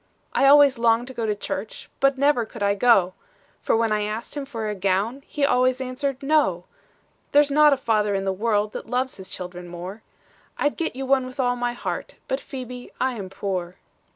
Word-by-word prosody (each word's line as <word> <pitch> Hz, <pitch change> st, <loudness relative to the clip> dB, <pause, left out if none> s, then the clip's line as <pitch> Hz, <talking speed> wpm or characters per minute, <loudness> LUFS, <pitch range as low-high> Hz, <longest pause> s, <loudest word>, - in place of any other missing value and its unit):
"'I 275 Hz, -, +4 dB
always 280 Hz, -3 st, +7 dB
longed 230 Hz, 0 st, +3 dB
to -, -, -8 dB
go 230 Hz, -2 st, -2 dB
to 210 Hz, -, 0 dB
church, 205 Hz, +1 st, -6 dB
But 275 Hz, 0 st, +3 dB
never 280 Hz, -3 st, +3 dB
could 220 Hz, -1 st, -7 dB
I 200 Hz, 0 st, +3 dB
go; 195 Hz, -4 st, +4 dB, 0.5 s
For -, -, +2 dB
when 225 Hz, -1 st, +1 dB
I 210 Hz, 0 st, +1 dB
asked 215 Hz, +5 st, -4 dB
him 285 Hz, -1 st, -4 dB
for 225 Hz, -5 st, -4 dB
a 210 Hz, -, -1 dB
gown, 200 Hz, +7 st, 0 dB
He 290 Hz, -2 st, 0 dB
always 255 Hz, -1 st, +2 dB
answered, 265 Hz, +1 st, -3 dB
"No. 275 Hz, -, +2 dB, 0.7 s
"'"There's 290 Hz, 0 st, +5 dB
not 300 Hz, +1 st, +6 dB
a 275 Hz, -, +3 dB
father 210 Hz, -5 st, +1 dB
in 195 Hz, 0 st, -2 dB
the 190 Hz, -, 0 dB
world 210 Hz, +1 st, 0 dB
That -, -, -7 dB
loves 255 Hz, +2 st, -1 dB
his 190 Hz, -1 st, -10 dB
children 180 Hz, -1 st, -7 dB
more; 180 Hz, +5 st, -8 dB, 0.6 s
I'd 290 Hz, -, 0 dB
get 330 Hz, -, -3 dB
you 270 Hz, +1 st, -4 dB
one 265 Hz, -1 st, +2 dB
with 255 Hz, +1 st, -12 dB
all 245 Hz, -1 st, +2 dB
my 245 Hz, 0 st, -1 dB
heart, 240 Hz, -, -5 dB
But, 265 Hz, -, -1 dB
Phebe, 250 Hz, -2 st, -8 dB
I 260 Hz, 0 st, +1 dB
am 200 Hz, -5 st, -6 dB
poor." 185 Hz, -2 st, -4 dB
235 Hz, 210 wpm, -24 LUFS, 205-265 Hz, 0.7 s, always